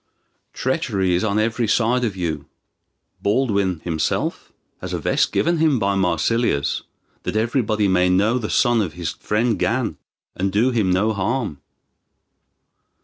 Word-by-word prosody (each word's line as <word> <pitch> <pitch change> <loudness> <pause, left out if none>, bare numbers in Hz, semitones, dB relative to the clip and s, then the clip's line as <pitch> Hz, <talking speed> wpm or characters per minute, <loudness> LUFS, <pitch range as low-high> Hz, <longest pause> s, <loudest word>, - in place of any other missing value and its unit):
Treachery 95 -2 0
is 90 - +1
on 105 -1 0
every 115 +2 0
side 120 +4 +2
of 110 -5 -1
you. 85 -4 -3 0.7
Baldwin 100 -6 +1
himself 80 -3 -2 0.3
has - - -6
a - - 0
vest - - +1
given 170 -1 +1
him 155 -4 +3
by 100 -2 +1
Marsilius, 90 - +1 0.4
that - - -4
everybody 110 -2 +1
may 90 -1 +3
know 105 +7 +2
the 105 - -4
son 120 -3 +3
of 90 -7 -3
his 85 -2 -3
friend 115 +1 -1
Gan, 120 +1 0 0.4
and 95 +1 -1
do 115 +6 +2
him 110 -6 +1
no 105 +5 +2
harm." 105 - -2
105 Hz, 145 wpm, -21 LUFS, 95-120 Hz, 0.7 s, him